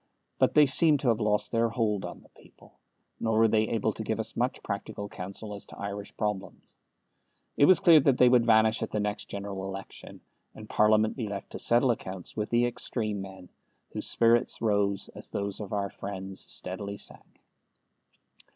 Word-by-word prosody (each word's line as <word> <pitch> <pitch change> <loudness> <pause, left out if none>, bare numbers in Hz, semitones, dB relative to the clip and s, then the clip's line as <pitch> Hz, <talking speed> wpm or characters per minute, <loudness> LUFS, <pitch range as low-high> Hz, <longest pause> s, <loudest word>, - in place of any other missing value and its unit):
But - - +3
they 150 -1 +8
seemed 145 +2 +3
to 130 - +2
have 115 -1 +2
lost 105 -1 0
their 115 0 +2
hold 110 -4 -1
on - - -8
the - - -22
people, - - -20 0.5
nor 110 -1 0
were 115 0 +6
they 110 0 +2
able 115 -3 0
to - - -6
give - - -2
us - - -2
much - - -1
practical 100 - -5
counsel 100 +3 -6
as 100 - -7
to - - -13
Irish 100 0 -6
problems. 105 -3 -4 0.8
It 145 - +5
was 185 +1 +6
clear 165 -2 +8
that 135 -2 +3
they 125 - +6
would 120 -1 +4
vanish 110 0 +4
at - - -2
the 105 - -2
next 105 0 -2
General 100 -1 -5
Election, 95 0 -8 0.3
and 110 - -10
Parliament 110 +1 +3
be 115 -5 -3
left 100 -1 -6
to - - -6
settle 120 +2 +3
accounts 95 -5 -6
with 105 0 -2
the 120 +1 +3
extreme 110 -4 -2
men, 95 -2 -10 0.4
whose - - -1
spirits 115 +1 +3
rose 100 -3 0
as - - -9
those 100 -1 -3
of 105 -3 -7
our 100 -2 -2
friends 95 -1 -6
steadily 100 +2 -4
sank. - - -9
105 Hz, 190 wpm, -28 LUFS, 100-115 Hz, 0.8 s, they